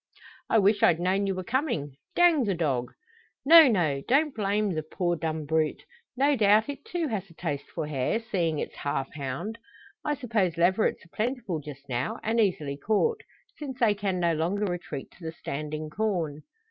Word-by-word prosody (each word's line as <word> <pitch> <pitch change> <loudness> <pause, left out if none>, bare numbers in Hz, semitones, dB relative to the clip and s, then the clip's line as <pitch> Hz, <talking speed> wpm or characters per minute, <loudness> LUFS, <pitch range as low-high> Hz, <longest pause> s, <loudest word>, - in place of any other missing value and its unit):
"I - - +4
wish 205 0 +4
I'd 165 - +5
known 190 +3 +1
ye - - +1
were 185 0 -4
comin'. 230 - -1 0.2
Dang 335 -7 +5
the 195 -3 0
dog!" 135 -7 -1 0.5
"No, 325 +1 +10
no! 165 - +1
Don't 290 +3 +3
blame 205 -1 0
the 155 - -1
poor 175 +3 -1
dumb 160 -2 -3
brute. 155 0 0 0.3
No 280 +2 +4
doubt, 215 +1 +4
it 285 - -6
too 350 -7 -2
has 195 -4 -3
a 165 - -18
taste 150 -5 -4
for 160 - -4
hare, 150 - 0
seeing 175 -9 -1
it's - - -5
half 135 -2 -3
hound. 150 - -5 0.4
I 295 - 0
suppose 215 - 0
leverets 185 +3 +2
are 170 - -23
plentiful 225 - -2
just 140 -2 -10
now, 125 0 -2
and 225 +2 +1
easily 155 -9 0
caught, 220 - +1 0.4
since 270 -4 -6
they 225 -5 +4
can 195 -3 -2
no 170 -1 +2
longer 175 +7 0
retreat 175 -6 -5
to 185 - -17
the 160 - -4
standing 155 0 -5
corn?" 170 -7 -1
185 Hz, 185 wpm, -27 LUFS, 155-225 Hz, 0.5 s, No